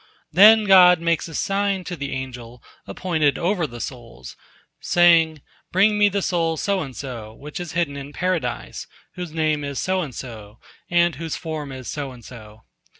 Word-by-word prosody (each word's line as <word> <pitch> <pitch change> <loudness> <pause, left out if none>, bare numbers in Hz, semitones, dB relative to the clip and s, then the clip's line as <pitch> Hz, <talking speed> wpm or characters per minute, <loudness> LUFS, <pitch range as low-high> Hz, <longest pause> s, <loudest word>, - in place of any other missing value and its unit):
Then 215 +5 +7
God 180 -3 +7
makes 170 -1 0
a 165 - -9
sign 195 -1 -1
to 175 0 -5
the 140 -4 -5
angel 125 -2 -7 0.2
appointed 160 -6 0
over 175 -2 0
the 120 -2 -10
souls, 115 - -8 0.4
saying, 165 -3 +3 0.3
"Bring 210 +3 +3
Me 205 0 +5
the 200 -1 -2
soul 165 -3 0
so 200 +2 0
and 135 -5 -7
so, 115 -5 -7
which 150 +6 -8
is 175 -3 -6
hidden 165 -4 -1
in 140 0 -8
Paradise, 175 - -3 0.3
whose 180 -3 -6
name 155 -2 0
is 140 -1 -5
so 185 0 0
and 145 -7 -6
so, 110 -4 -9 0.3
and 175 0 +2
whose 165 -1 -4
form 155 -4 -6
is 130 -2 -8
so 145 -3 -4
and 120 -2 -15
so." 110 -2 -13
160 Hz, 175 wpm, -22 LUFS, 130-180 Hz, 0.4 s, Then